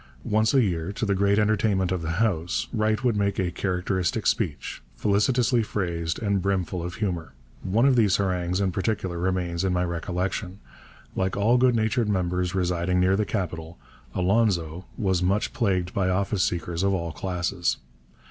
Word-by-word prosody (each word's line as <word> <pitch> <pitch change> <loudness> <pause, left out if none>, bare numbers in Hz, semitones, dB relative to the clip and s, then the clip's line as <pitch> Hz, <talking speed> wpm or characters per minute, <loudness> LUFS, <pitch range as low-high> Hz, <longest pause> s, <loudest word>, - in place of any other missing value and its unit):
Once 110 +1 +2
a 135 -3 +4
year, 85 -3 -1
to 110 - -3
the 100 - +1
great 100 +1 +2
entertainment 105 -3 +2
of 90 -2 -1
the 80 0 -2
House, 90 -4 0
Wright 110 +1 +1
would 120 -3 +2
make 100 -1 0
a 90 -2 0
characteristic 95 +2 -1
speech, 90 -11 -1
felicitously 115 +4 +2
phrased 85 -6 -2
and 100 -3 0
brimful 95 -2 -1
of 90 +1 -5
humour. 90 -8 -3 0.3
One 105 +6 +2
of 135 -2 +5
these 105 -6 +4
harangues 90 -2 0
in 95 -2 +1
particular 95 -2 -2
remains 90 -1 -1
in 95 -1 +1
my 90 0 +1
recollection. 90 +2 -3 0.6
Like 95 +1 -1
all 115 +5 +3
good 125 -1 +4
natured 110 0 +1
members 90 -1 0
residing 90 0 0
near 95 +1 +3
the 105 +1 +1
capital, 85 -5 -4 0.4
'Alonzo' 90 -4 +1
was 95 -5 +1
much 95 +4 0
plagued 95 -7 0
by 95 -2 +1
office 95 +1 0
seekers 85 -1 -1
of 100 0 +2
all 85 -2 -3
classes. 90 +2 -1
95 Hz, 165 wpm, -25 LUFS, 90-105 Hz, 0.6 s, of